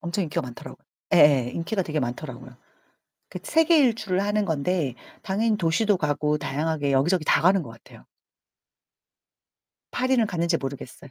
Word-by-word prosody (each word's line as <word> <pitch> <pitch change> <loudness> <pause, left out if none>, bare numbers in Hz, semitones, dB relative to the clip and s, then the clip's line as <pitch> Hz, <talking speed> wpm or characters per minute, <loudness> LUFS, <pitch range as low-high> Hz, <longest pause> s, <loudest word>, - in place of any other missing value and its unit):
엄청 185 +1 -2
인기가 150 - -2
많더라고요. 125 -2 -11 0.3
예예. 135 -5 +5
인기가 190 +4 -2
되게 155 -3 -3
많더라고요. 125 0 -6 0.7
그 - - -7
세계일주를 235 - +2
하는 205 +1 0
건데 160 -4 -1 0.3
당연히 215 +3 0
도시도 200 +4 +1
가고 150 -1 -1
다양하게 145 0 -2
여기저기 155 +5 +2
다 - - +3
가는 185 +1 +4
것 135 - -10
같아요. 115 0 -16 1.9
파리는 255 -2 +1
갔는지 170 -3 0
모르겠어요. 135 0 -8
165 Hz, 355 characters per minute, -24 LUFS, 140-200 Hz, 1.9 s, 예예